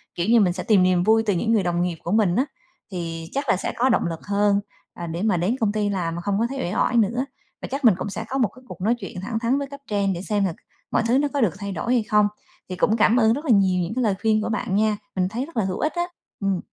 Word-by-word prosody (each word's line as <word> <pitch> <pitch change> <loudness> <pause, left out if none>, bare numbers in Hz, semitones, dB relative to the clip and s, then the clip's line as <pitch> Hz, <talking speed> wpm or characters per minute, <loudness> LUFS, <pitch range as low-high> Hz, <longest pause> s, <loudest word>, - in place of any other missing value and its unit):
kiểu 175 +1 -1
như, 235 0 +6
mình 185 -4 +3
sẽ 180 - -5
tìm 200 -5 +4
niềm 180 -1 +3
vui 220 +3 +4
từ 205 - +2
những 220 +6 0
người 210 -4 +3
đồng 175 0 0
nghiệp 175 -2 -1
của 170 - -3
mình 205 -5 +3
á, 260 - +2 0.5
thì 165 -2 -5
chắc 275 -1 -2
là - - +5
sẽ - - -3
có 255 +2 +3
động 235 - +2
lực 165 -1 -4
hơn, 205 0 +2 0.3
à, 170 - -6
để 165 +3 -4
mà 210 -5 +2
đến 185 +8 +1
công 215 -3 +2
ty 210 -1 0
làm 175 -4 -2
mà 170 - -4
không 200 +1 -1
có 230 - +2
thấy 275 - -5
uể 180 -3 -2
oải 245 - +1
nữa. 230 +4 +2 0.4
Và - - -5
chắc 275 -1 -2
mình 210 -6 +7
cũng 205 - -4
sẽ 220 - -5
có 270 - -1
một 245 -5 +3
cái 255 - -15
cuộc 185 - -10
nói 225 +5 +2
chuyện 190 -2 -7
thẳng 225 +3 -3
thắn 245 +4 +1
với 280 - -3
cấp 280 0 -10
trên, 200 -2 0
để 175 - -5
xem 205 -1 0
là 175 - -1 0.4
mọi - - +2
thứ 245 - +3
nó 290 +1 +2
có 280 - +1
được 215 -8 +2
thay 200 -1 -4
đổi 240 +5 -1
hay 235 - +2
không. 210 -1 +3 0.4
Thì 185 - -4
cũng 215 +5 +2
cảm 225 +2 +4
ơn 225 -2 +4
rất 295 +5 -4
là 260 - +2
nhiều 190 -4 +4
những 175 - -4
cái 255 - 0
lời 210 -4 +2
khuyên 220 -1 +2
của 215 - -2
bạn 210 -3 -1
nha, 215 0 +2 0.2
mình 185 -1 +1
thấy 240 +6 -3
rất 330 -7 -12
là 215 - +2
hữu 185 -1 -3
ích 305 - 0
á, 345 - +1 0.4
ừm. 195 -3 0
210 Hz, 310 wpm, -23 LUFS, 185-230 Hz, 0.5 s, mình